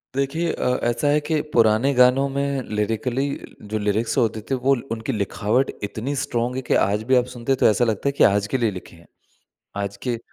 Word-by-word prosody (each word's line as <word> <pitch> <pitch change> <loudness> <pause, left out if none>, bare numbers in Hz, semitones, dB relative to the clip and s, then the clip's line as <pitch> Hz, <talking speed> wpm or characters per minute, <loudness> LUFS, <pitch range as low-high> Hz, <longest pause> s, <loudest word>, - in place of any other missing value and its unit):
देखिए 150 +5 0
अ, 125 0 0
ऐसा 120 +4 0
है 145 +1 +4
कि 155 -2 +1
पुराने 115 +4 +3
गानों 125 +2 +4
में 140 0 -1
लिरिकली, 120 +6 -1 0.3
जो 105 +1 -4
लिरिक्स 105 +5 -1
होते 110 -3 +1
थे, 135 - +1
वो 130 +2 +2 0.2
उनकी 110 -1 -3
लिखावट 105 +5 0
इतनी 115 +7 -3
स्ट्रॉन्ग 125 -3 -2
है 130 - -2
कि - - +4
आज 105 +2 0
भी 130 - +5
आप 125 -1 +3
सुनते 120 +2 -3
हैं, 135 - +3
तो - - +3
ऐसा 115 +3 +2
लगता 110 +3 -1
है - - 0
कि - - +7
आज 100 0 +3
के - - +3
लिए 115 -4 +1
लिखे 90 -2 -10
हैं। 85 0 -19 0.8
आज 100 0 -4
के 120 -2 -1
120 Hz, 215 wpm, -22 LUFS, 110-135 Hz, 0.8 s, कि